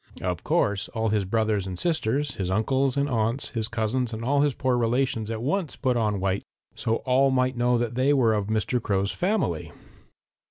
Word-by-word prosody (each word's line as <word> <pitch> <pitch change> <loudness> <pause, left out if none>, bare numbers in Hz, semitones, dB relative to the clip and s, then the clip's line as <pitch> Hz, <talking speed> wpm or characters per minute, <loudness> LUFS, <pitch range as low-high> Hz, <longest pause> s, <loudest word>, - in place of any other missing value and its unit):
Of 90 -3 -2
course 100 -2 +1
all 110 0 0
his 105 -2 +1
brothers 110 -1 0
and 90 -1 -5
sisters, 145 - 0
his 95 -2 -3
uncles 130 +7 +1
and 140 0 +2
aunts, 115 0 -1
his 110 -3 0
cousins 120 +1 -1
and 110 +1 -5
all 140 +2 +2
his 145 -2 +1
poor 130 -2 +1
relations 120 -2 0
at 115 0 -4
once 160 +4 -1
put 130 -3 0
on 105 -4 0
white, 95 +1 -1 0.3
that - - -4
all 130 +4 +2
might 130 0 +1
know 120 0 +2
that 120 -1 -1
they 130 +3 +2
were 125 -6 +3
of 105 -2 -1
Mr. 110 +3 0
Crow's 100 -2 0
family. 180 - -1
115 Hz, 195 wpm, -25 LUFS, 105-130 Hz, 0.3 s, were